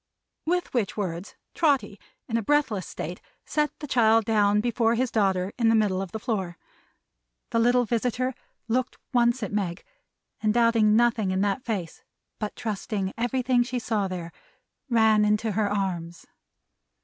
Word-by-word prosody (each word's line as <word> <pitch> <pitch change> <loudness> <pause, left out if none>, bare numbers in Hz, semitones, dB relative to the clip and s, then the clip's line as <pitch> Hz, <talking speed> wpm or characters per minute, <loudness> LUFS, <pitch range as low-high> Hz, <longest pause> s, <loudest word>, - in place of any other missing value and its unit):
With 355 +1 0
which 225 -6 -1
words 180 -2 -4 0.2
Trotty, 275 - +1 0.3
in 230 - -3
a 230 - +2
breathless 225 - +1
state, 175 +3 -6 0.2
set 300 -1 +1
the 295 - -7
child 225 -4 +4
down 210 -2 +3
before 230 0 +1
his 250 +1 0
daughter 190 -3 +1
in 230 -1 +4
the 225 - +4
middle 200 -4 +2
of 195 -3 -6
the - - -4
floor. 195 -7 -3 0.9
The 230 - +2
little 245 +1 +3
visitor 245 +3 -1 0.3
looked 250 +3 -1 0.2
once 240 0 +3
at 205 - -4
Meg; 185 -5 -2 0.6
and 215 0 +1
doubting 230 -3 +4
nothing 230 -3 +2
in 185 +1 0
that 205 +4 0
face, 195 -8 -4 0.4
but 210 -1 -4
trusting 200 -2 -3
everything 245 +1 +1
she 245 +1 -2
saw 220 -4 -1
there; 175 -2 -6 0.6
ran 220 -3 +4
into 210 +1 +1
her 205 0 0
arms. 180 -4 -3
220 Hz, 155 wpm, -26 LUFS, 200-240 Hz, 0.9 s, child